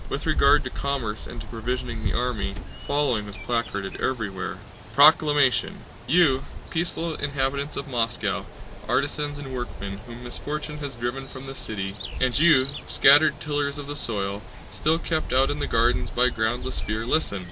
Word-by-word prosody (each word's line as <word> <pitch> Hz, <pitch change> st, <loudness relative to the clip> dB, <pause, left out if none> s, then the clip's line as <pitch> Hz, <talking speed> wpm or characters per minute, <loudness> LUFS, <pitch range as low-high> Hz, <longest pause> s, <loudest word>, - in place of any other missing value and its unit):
With -, -, -3 dB
regard -, -, +4 dB
to -, -, -5 dB
commerce 130 Hz, -7 st, -3 dB
and -, -, -8 dB
to -, -, -7 dB
provisioning 120 Hz, 0 st, -4 dB
the -, -, 0 dB
army, 120 Hz, -5 st, -1 dB
the -, -, -11 dB
following 135 Hz, -7 st, +1 dB
was 100 Hz, -, -8 dB
placarded 105 Hz, -5 st, -3 dB
everywhere: 105 Hz, -8 st, -2 dB, 0.4 s
PROCLAMATION 145 Hz, -2 st, +5 dB, 0.3 s
You, 140 Hz, -3 st, +4 dB, 0.3 s
peaceful 165 Hz, 0 st, -1 dB
inhabitants 140 Hz, 0 st, -2 dB
of 140 Hz, -, -4 dB
Moscow, 110 Hz, -5 st, -1 dB, 0.4 s
artisans 145 Hz, -1 st, 0 dB
and 135 Hz, -2 st, -7 dB
workmen 100 Hz, -5 st, -5 dB
whom 120 Hz, 0 st, -9 dB
misfortune 150 Hz, +4 st, -4 dB
has 140 Hz, -3 st, -5 dB
driven 120 Hz, +3 st, -3 dB
from 130 Hz, 0 st, -9 dB
the 135 Hz, -, -6 dB
city, 105 Hz, -7 st, -4 dB, 0.3 s
and 130 Hz, -1 st, +2 dB
you 155 Hz, -5 st, +7 dB, 0.2 s
scattered 145 Hz, +1 st, +6 dB
tillers 145 Hz, -1 st, -1 dB
of 145 Hz, -, -6 dB
the 145 Hz, +1 st, -5 dB
soil, 100 Hz, -6 st, -2 dB, 0.3 s
still 160 Hz, +2 st, +1 dB
kept 160 Hz, -4 st, -2 dB
out 135 Hz, +2 st, +4 dB
in 145 Hz, -, -3 dB
the -, -, -1 dB
fields 115 Hz, +2 st, +2 dB
by 125 Hz, +1 st, +3 dB
groundless 120 Hz, +3 st, -1 dB
fear, 105 Hz, +5 st, -3 dB
listen! 125 Hz, -6 st, +1 dB
130 Hz, 160 wpm, -25 LUFS, 115-145 Hz, 0.4 s, you